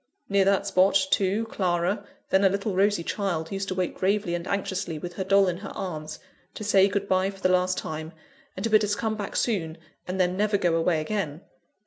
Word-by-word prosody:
Near 200 -1 +3
that 200 0 +2
spot, 190 -1 +3 0.2
too, 200 +3 +2
Clara 185 -1 -1 0.3
then 190 +1 +4
a 195 - +6
little 200 +1 -2
rosy 195 -1 +2
child 170 -5 -2
used 195 0 -3
to 185 - -3
wait 180 -1 -1
gravely 195 -1 0
and 175 +1 -3
anxiously, 190 -4 -2
with 175 +3 -6
her 190 - -3
doll 195 +1 +4
in 175 -1 -1
her 195 +1 -8
arms, 155 -5 -5 0.4
to - - -6
say 200 -2 +5
good 200 0 -2
bye 185 0 +2
for 195 -1 -10
the 185 - +3
last 185 0 +2
time, 155 +1 -5 0.5
and 190 - -4
to 230 - 0
bid 215 0 +5
us 205 0 +1
come 220 0 -2
back 205 -2 -5
soon, 170 -8 -1 0.3
and 185 +1 -3
then 180 0 +2
never 205 +1 +2
go 175 -3 +1
away 165 -1 +1
again. 160 -4 -3
190 Hz, 215 wpm, -26 LUFS, 175-200 Hz, 0.5 s, a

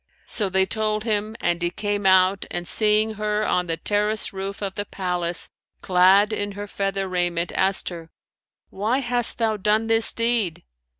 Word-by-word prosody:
So 205 -3 -1
they 190 0 +3
told 215 +1 -1
him 215 -1 -1
and 170 0 -1
he 175 - +1
came 205 +2 -2
out 190 +1 +3
and, 175 -1 -5
seeing 215 +2 +3
her 210 0 0
on 180 0 0
the 165 -1 -1
terrace 210 +2 0
roof 195 +1 -5
of 195 -1 -3
the 205 - -3
palace, 180 -3 -1 0.3
clad 190 +3 +4
in 205 -1 -3
her 205 +1 -6
feather 195 -1 -2
raiment, 175 -2 -1
asked 190 0 +1
her, 165 -2 -9 0.6
'Why 215 +6 0
hast 245 -3 -1
thou 220 -2 0
done 210 +2 +1
this 225 0 +2
deed?' 230 -7 0
200 Hz, 170 wpm, -23 LUFS, 185-215 Hz, 0.6 s, clad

